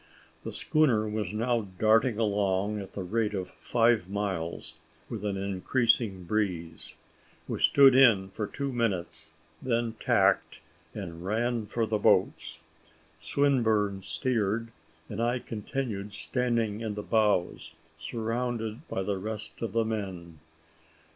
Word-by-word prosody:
The -, -, -5 dB
schooner 125 Hz, -9 st, +2 dB
was 105 Hz, -3 st, -2 dB
now 115 Hz, +2 st, 0 dB, 0.2 s
darting 110 Hz, +2 st, +3 dB
along 100 Hz, -1 st, +1 dB
at 100 Hz, -, -8 dB
the 100 Hz, -, -4 dB
rate 105 Hz, +3 st, 0 dB
of 95 Hz, -2 st, -4 dB
five 115 Hz, -5 st, +1 dB
miles, 85 Hz, -5 st, -3 dB, 0.3 s
with 110 Hz, -4 st, -5 dB
an 100 Hz, -2 st, -1 dB
increasing 100 Hz, +1 st, +1 dB
breeze. 90 Hz, -4 st, -2 dB, 0.5 s
We -, -, -3 dB
stood 140 Hz, -2 st, +7 dB
in 115 Hz, -8 st, +5 dB
for 105 Hz, +2 st, -4 dB
two 140 Hz, +3 st, -4 dB
minutes, 110 Hz, -8 st, -2 dB, 0.3 s
then 115 Hz, -2 st, 0 dB
tacked, -, -, +2 dB, 0.4 s
and 85 Hz, 0 st, -6 dB
ran 115 Hz, +2 st, -1 dB
for 115 Hz, +2 st, 0 dB
the 110 Hz, -1 st, -1 dB
boats. -, -, +2 dB, 0.6 s
Swinburne 110 Hz, -2 st, +1 dB
steered, 115 Hz, -1 st, -1 dB, 0.4 s
and 105 Hz, -, -4 dB
I 120 Hz, +2 st, +1 dB
continued 110 Hz, -3 st, -4 dB
standing 115 Hz, -1 st, -1 dB
in 110 Hz, -2 st, -3 dB
the 105 Hz, -, -4 dB
bows, 105 Hz, -6 st, +1 dB, 0.3 s
surrounded 115 Hz, -, -3 dB
by 95 Hz, -, -2 dB
the 100 Hz, 0 st, -2 dB
rest 105 Hz, +1 st, -5 dB
of 115 Hz, -, -3 dB
the 115 Hz, -1 st, +2 dB
men. 95 Hz, -7 st, -5 dB
110 Hz, 130 wpm, -29 LUFS, 100-115 Hz, 0.6 s, stood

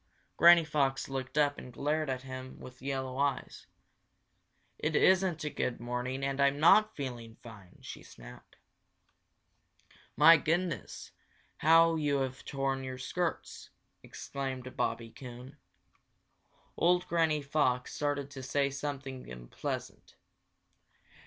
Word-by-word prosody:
Granny 170 Hz, 0 st, +7 dB
Fox 140 Hz, -4 st, 0 dB
looked 135 Hz, +1 st, -5 dB
up 145 Hz, -1 st, +2 dB
and 125 Hz, -, -10 dB
glared 150 Hz, +4 st, -1 dB
at 130 Hz, -1 st, -3 dB
him 130 Hz, 0 st, -8 dB
with 125 Hz, 0 st, -12 dB
yellow 130 Hz, -1 st, -3 dB
eyes. 140 Hz, -1 st, -2 dB, 1.1 s
"It 155 Hz, +1 st, -1 dB
isn't 185 Hz, -3 st, +3 dB
a 150 Hz, -, -2 dB
good 125 Hz, -3 st, -2 dB
morning 125 Hz, +3 st, -4 dB
and 135 Hz, 0 st, -1 dB
I'm 140 Hz, +1 st, +3 dB
not 215 Hz, +7 st, +5 dB
feeling 120 Hz, -5 st, -6 dB
fine!" 100 Hz, -6 st, -13 dB
she -, -, -9 dB
snapped. -, -, -14 dB, 1.6 s
"My 165 Hz, +4 st, +8 dB
goodness, 165 Hz, +2 st, -2 dB, 0.5 s
how 165 Hz, +1 st, +5 dB
you 145 Hz, -2 st, +1 dB
have 130 Hz, 0 st, -4 dB
torn 135 Hz, -1 st, -2 dB
your 130 Hz, -1 st, -6 dB
skirts!" 170 Hz, +6 st, -4 dB, 0.3 s
exclaimed 130 Hz, -2 st, -6 dB
Bobby 115 Hz, 0 st, -2 dB
Coon. 125 Hz, +2 st, -11 dB, 1.2 s
Old 180 Hz, +1 st, +2 dB
Granny 160 Hz, -3 st, +1 dB
Fox 135 Hz, -3 st, 0 dB
started 145 Hz, -1 st, -2 dB
to 135 Hz, -2 st, -8 dB
say 140 Hz, +2 st, 0 dB
something 135 Hz, -, -6 dB
unpleasant. -, -, -7 dB
135 Hz, 120 wpm, -31 LUFS, 130-150 Hz, 1.6 s, My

